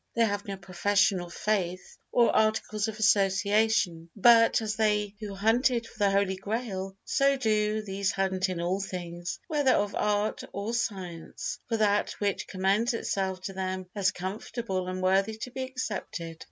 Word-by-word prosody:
They 230 0 +4
have 205 -1 -2
no 195 -1 -4
profession 190 +1 +1
of 175 0 -8
faith 185 -3 -2
or 235 -1 +4
articles 215 0 +1
of 220 -1 -5
association, 200 -3 +2
but, 230 +2 +6
as 215 -1 -2
they 210 -2 +1
who 205 -3 -6
hunted 235 +4 +2
for 225 - -15
the 200 -1 +4
Holy 195 -1 +1
Grail, 195 -2 -4
so 275 -1 +3
do 215 -3 +1
these 195 -1 -1
hunt 190 -1 0
in 180 -2 -3
all 180 +3 0
things, 175 -2 -5
whether 290 -4 +3
of 205 0 +1
art 210 0 0
or 205 +3 -3
science, 185 -8 -4
for 225 - +1
that 210 -1 +2
which 200 -2 -2
commends 200 +6 +1
itself 190 -4 -2
to 195 - -5
them 185 0 -3
as 200 -3 +2
comfortable 190 +1 -4
and 185 0 -4
worthy 195 +4 +2
to 250 +3 -6
be 260 +1 -5
accepted. 210 -10 -5
200 Hz, 165 wpm, -28 LUFS, 190-220 Hz, -, but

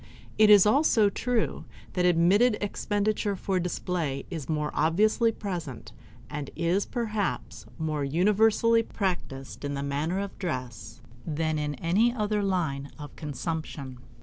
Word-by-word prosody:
It 215 -1 +7
is 205 -2 +8
also 220 -3 +4
true 245 0 -1 0.3
that 180 -1 +1
admitted 190 +7 +4
expenditure 205 0 -1
for 190 0 -1
display 170 -5 -2
is 160 -5 -5
more 150 -1 -1
obviously 215 +9 +3
present, 175 - -6 0.4
and 145 -1 -5
is, 170 +4 0
perhaps, 220 -5 -3
more 155 -2 -2
universally 210 +9 +3
practiced 175 - -4
in 145 0 -2
the 140 - -3
matter 145 +6 -1
of 200 0 -4
dress 130 - -5 0.2
than 155 0 -1
in 150 -1 -2
any 195 +10 +2
other 210 -3 -1
line 160 -8 -1
of 145 -2 -9
consumption. 145 -2 -5
180 Hz, 130 wpm, -27 LUFS, 150-210 Hz, 0.4 s, is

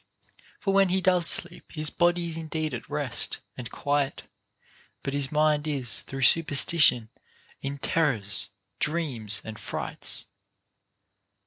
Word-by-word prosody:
For 195 - -1
when 195 -1 +4
he 185 +2 +1
does 180 -2 +5
sleep 175 +1 +2
his 155 -1 -1
body 175 0 +1
is 165 -1 -5
indeed 160 -1 -4
at - - -7
rest - - -1 0.2
and 125 -2 -8
quiet, 145 -1 -2 0.8
but 135 - -4
his 140 -1 -2
mind 150 0 +1
is 130 -6 -1
through 135 0 -6
superstition 145 -6 +4 0.5
in 140 +1 -5
terrors, 110 -11 0 0.3
dreams, 140 -10 -2
and 110 -1 -8
frights. - - -2
150 Hz, 125 wpm, -26 LUFS, 135-170 Hz, 0.8 s, does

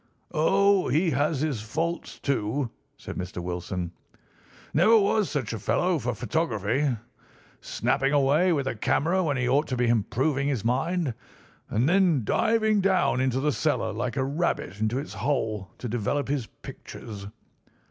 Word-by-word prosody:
"Oh, 195 +4 +3
he 160 +6 +2
has 145 0 +1
his 145 -8 -1
faults, 160 +10 -3
too," 130 -1 -1 0.3
said - - -8
Mr. 90 0 -5
Wilson. 90 0 -4 0.8
"Never 215 +9 +6
was 210 -1 +2
such 135 -7 -2
a 115 - -4
fellow 175 - +1
for 125 -2 -2
photography. 120 - 0 0.6
Snapping 135 +1 0
away 145 +5 +3
with 145 -5 +1
a 135 - -1
camera 170 - +1
when 145 -5 0
he 125 -1 0
ought 140 +4 +2
to 130 - -2
be 125 - +2
improving 130 +5 +1
his 130 -7 -1
mind, 160 +4 0 0.6
and 115 +5 +1
then 175 - +3
diving 220 - +2
down 185 -9 +2
into 130 -1 +1
the 150 +2 +1
cellar 110 -4 0
like 120 +4 -3
a 130 - +2
rabbit 140 - -2
into 110 +3 0
its 140 -2 -5
hole 110 -3 -1
to 125 - -5
develop 120 +5 -1
his 135 -6 -1
pictures. 100 -4 -10
135 Hz, 155 wpm, -26 LUFS, 115-160 Hz, 0.8 s, Never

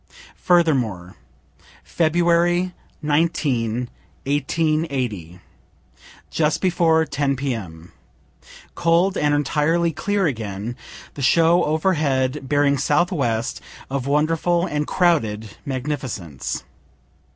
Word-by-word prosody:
Furthermore. 125 - +1 0.7
February 175 +2 +2 0.3
19, 135 -7 0 0.4
1880. 140 - -1 0.9
Just 155 -1 +1
before 165 -3 +2
10 140 -2 -1
P.M. 105 - -5 0.8
cold 175 +3 +2
and 150 -3 +2
entirely 160 +4 +1
clear 200 +5 -1
again, 110 -4 -3 0.4
the 140 - -7
show 165 +6 +4
overhead, 150 -5 0
bearing 145 -1 +2
southwest, 140 - 0 0.3
of 135 -1 -2
wonderful 165 +4 +1
and 150 -3 -2
crowded 110 - +1 0.2
magnificence. 130 - -4
145 Hz, 80 wpm, -22 LUFS, 125-165 Hz, 0.9 s, show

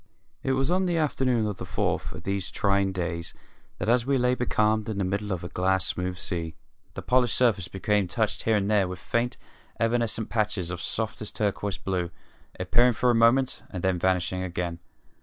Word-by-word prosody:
It 135 - 0
was 135 +4 +1
on 185 +1 +2
the 175 -1 +1
afternoon 130 -7 +1
of 105 -3 -3
the - - -6
fourth - - -1
of - - -9
these 100 0 -2
trying 100 -1 +1
days 85 -2 -3 0.4
that, - - -3
as 120 +1 +4
we 135 +2 +1
lay 125 0 +3
becalmed 110 -3 +1
in 110 - -3
the 100 - 0
middle 100 +2 -2
of 90 -3 -2
a - - -3
glass 95 +1 +1
smooth 90 0 -2
sea, 85 -4 -3 0.4
the - - -6
polished 125 -2 +2
surface 110 -8 +2
became 100 +2 0
touched 110 +3 -1
here 110 - +2
and 100 -1 +1
there 100 -3 +3
with 90 0 -5
faint, 120 +7 -1 0.4
evanescent 115 -1 +1
patches 105 -6 -1
of 85 0 -5
softest 110 0 -2
turquoise 100 -1 -1
blue, 90 -3 -2 0.5
appearing 120 +7 +4
for 125 +2 +2
a - - +2
moment 120 +3 +3
and 90 -3 -6
then 95 -1 +1
vanishing 95 0 +1
again. 90 -2 -3
105 Hz, 195 wpm, -27 LUFS, 90-120 Hz, 0.5 s, as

